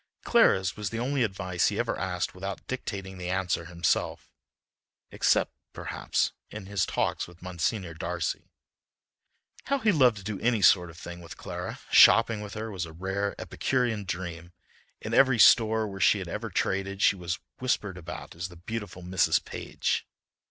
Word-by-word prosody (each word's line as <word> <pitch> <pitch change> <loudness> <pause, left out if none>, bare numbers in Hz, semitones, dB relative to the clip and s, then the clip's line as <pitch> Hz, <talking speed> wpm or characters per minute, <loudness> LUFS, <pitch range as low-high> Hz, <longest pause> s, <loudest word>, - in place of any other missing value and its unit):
Clara's 95 -1 +4
was 105 -2 -3
the 110 - -5
only 130 +3 0
advice 95 -5 0
he - - -1
ever - - 0
asked - - -2
without 95 +1 -6
dictating 95 -7 -5
the 90 0 -4
answer 90 -2 -1
himself—except, 85 -1 -2 0.2
perhaps, - - -1 0.2
in 105 -2 -8
his 100 -1 0
talks - - -1
with 85 0 -16
Monsignor 90 0 -2
Darcy. 85 0 -3 1.2
How 280 - +1
he 220 -5 +3
loved 130 - +4
to 100 - -9
do 100 0 -4
any 115 -3 +1
sort 90 -2 +5
of 80 - -13
thing 85 0 -8
with 85 - -10
Clara! - - -6
Shopping 115 +3 +7
with 105 -1 -7
her 110 +1 -4
was 90 -4 -4
a 80 - -11
rare, 95 +4 -2
epicurean 120 -6 -1
dream. 85 -1 -5 0.5
In - - -5
every 130 -3 +5
store 110 0 +6
where 95 -1 -7
she - - +5
had 95 -3 -5
ever 110 +6 -4
traded 95 +1 -1
she - - +5
was 90 -1 -3 0.2
whispered 105 -6 -1
about 85 -1 -8
as 85 +2 -4
the 90 - -14
beautiful 95 0 -6
Mrs. 90 0 +2
Page. - - -2
95 Hz, 165 wpm, -28 LUFS, 90-110 Hz, 1.2 s, Shopping